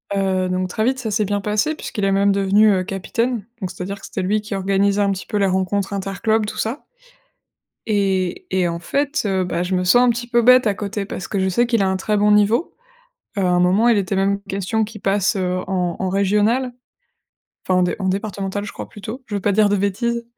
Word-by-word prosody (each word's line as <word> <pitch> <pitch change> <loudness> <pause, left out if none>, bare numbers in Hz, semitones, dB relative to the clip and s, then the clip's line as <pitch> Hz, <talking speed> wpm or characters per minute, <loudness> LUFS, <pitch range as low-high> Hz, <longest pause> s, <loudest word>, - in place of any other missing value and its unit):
heu, 190 -1 0
donc 185 0 -1
très 215 +4 -1
vite, 260 +2 +1
ça 225 -4 -3
s'est 210 +1 +1
bien 205 +1 -1
passé 210 +10 0
puisqu'il 210 -8 -4
est 195 - +2
même 200 +1 +3
devenu, 200 +2 +4
heu, 185 - 0
capitaine. 210 +4 -2
Donc, 185 -3 -4
c'est-à-dire 195 +2 -6
que - - -11
c'était 190 - -4
lui 205 +4 +1
qui 210 -1 -5
organisait 195 +1 +1
un 200 - +2
petit 190 -1 -4
peu - - -6
les 200 - +2
rencontres 190 +1 -1
interclubs, 200 +3 0
tout - - -6
ça 230 +6 -3 1.0
et 190 -3 0
et 185 -2 +2
en 170 0 -3
fait, 280 - -1
heu, 190 -2 0
bah, 175 0 -2
je 180 +1 -3
me 180 - +1
sens 245 +7 +5
un 250 - +4
petit 240 +1 -2
peu 240 0 +2
bête 250 0 +6
à 205 - +2
côté, 205 0 -4
parce 190 - -6
que 200 - -2
je 190 0 +1
sais 240 +7 +2
qu'il 230 -3 +1
a 190 - +2
un 190 - 0
très 210 +2 -1
bon 210 +1 +3
niveau. 210 +8 +3 0.7
Heu, 195 - +1
à 180 - +2
un 180 0 +3
moment, 190 +6 +3
il 235 - +4
était 195 0 -1
même 200 +1 +1
question 200 +3 -1
qu'il 210 -1 -10
passe, 195 0 +1
heu, 185 -1 -1
en 180 -3 -1
en 190 - -1
régionales. 210 +6 +1 0.9
Enfin 185 -1 +3
en - - +3
dé 180 - 0
en 190 - -1
départementales, 200 0 -3
je 205 - -7
crois, - - -8
plutôt. 220 +5 -8
Je 210 - -6
veux 200 - -1
pas 205 - +1
dire 205 0 +3
de 205 - +2
bêtises, 235 +5 -1
200 Hz, 240 wpm, -20 LUFS, 190-215 Hz, 1.0 s, bête